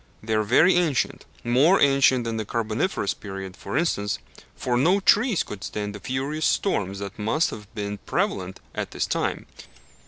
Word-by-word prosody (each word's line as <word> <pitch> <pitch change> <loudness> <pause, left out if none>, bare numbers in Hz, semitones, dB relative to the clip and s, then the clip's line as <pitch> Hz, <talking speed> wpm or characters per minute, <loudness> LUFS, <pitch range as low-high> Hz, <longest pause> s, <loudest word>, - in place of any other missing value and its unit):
They 110 0 -2
are 110 - +3
very 130 - +5
ancient 160 -7 0 0.2
more 135 +11 +4
ancient 135 -3 +4
than 115 -1 -3
the 110 - -1
Carboniferous 110 - -1
period, 95 -2 -7
for 135 - -4
instance, 105 -11 0 0.4
for 125 - -1
no 175 +11 +4
trees 210 +1 +3
could 100 -3 -8
stand 105 +2 -4
the 105 - -8
furious 135 +7 -1
storms 100 - 0
that 100 +1 -7
must 115 +10 +1
have 105 -1 -9
been 105 -1 -4
prevalent 95 0 -2
at - - -3
this - - -2
time. - - -2
115 Hz, 165 wpm, -24 LUFS, 105-145 Hz, 0.4 s, very